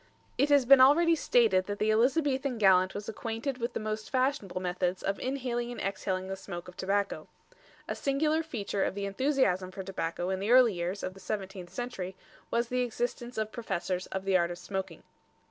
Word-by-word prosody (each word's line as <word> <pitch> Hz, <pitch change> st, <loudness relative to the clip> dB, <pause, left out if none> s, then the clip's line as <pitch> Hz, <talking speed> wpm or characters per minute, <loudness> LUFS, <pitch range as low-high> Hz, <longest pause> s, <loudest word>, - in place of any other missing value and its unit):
It 280 Hz, +3 st, +2 dB
has 285 Hz, -3 st, +5 dB
been 270 Hz, +1 st, +8 dB
already 330 Hz, +6 st, +6 dB
stated 225 Hz, -10 st, +3 dB
that 205 Hz, 0 st, -3 dB
the 215 Hz, +1 st, +2 dB
Elizabethan 265 Hz, +2 st, +2 dB
gallant 190 Hz, -3 st, +4 dB
was 205 Hz, 0 st, -5 dB
acquainted 230 Hz, +4 st, -4 dB
with 235 Hz, +1 st, -2 dB
the -, -, -2 dB
most 215 Hz, 0 st, -4 dB
fashionable 255 Hz, -8 st, 0 dB
methods 180 Hz, 0 st, -2 dB
of 195 Hz, 0 st, -1 dB
inhaling 245 Hz, -2 st, -2 dB
and 245 Hz, -, -7 dB
exhaling 190 Hz, -1 st, -2 dB
the 195 Hz, -, -3 dB
smoke 180 Hz, -2 st, -8 dB
of 180 Hz, -, -11 dB
tobacco. 200 Hz, +1 st, -1 dB, 0.6 s
A -, -, -2 dB
singular 305 Hz, +3 st, +1 dB
feature 215 Hz, -10 st, -2 dB
of -, -, -1 dB
the 200 Hz, 0 st, -3 dB
enthusiasm 200 Hz, -4 st, +1 dB
for 190 Hz, +1 st, -7 dB
tobacco 180 Hz, -1 st, -3 dB
in 190 Hz, -, -1 dB
the 200 Hz, +3 st, -2 dB
early 245 Hz, -3 st, +6 dB
years 180 Hz, +3 st, -3 dB
of 185 Hz, -, -3 dB
the 195 Hz, -, -14 dB
seventeenth 190 Hz, -2 st, -5 dB
century 195 Hz, -7 st, -5 dB, 0.3 s
was 235 Hz, 0 st, 0 dB
the 250 Hz, 0 st, 0 dB
existence 240 Hz, 0 st, -3 dB
of 215 Hz, 0 st, -2 dB
professors 185 Hz, -5 st, -3 dB
of 190 Hz, 0 st, -5 dB
the 195 Hz, -1 st, +2 dB
art 170 Hz, -1 st, +3 dB
of 175 Hz, -, -5 dB
smoking. 190 Hz, +2 st, -5 dB
210 Hz, 195 wpm, -30 LUFS, 190-250 Hz, 0.6 s, been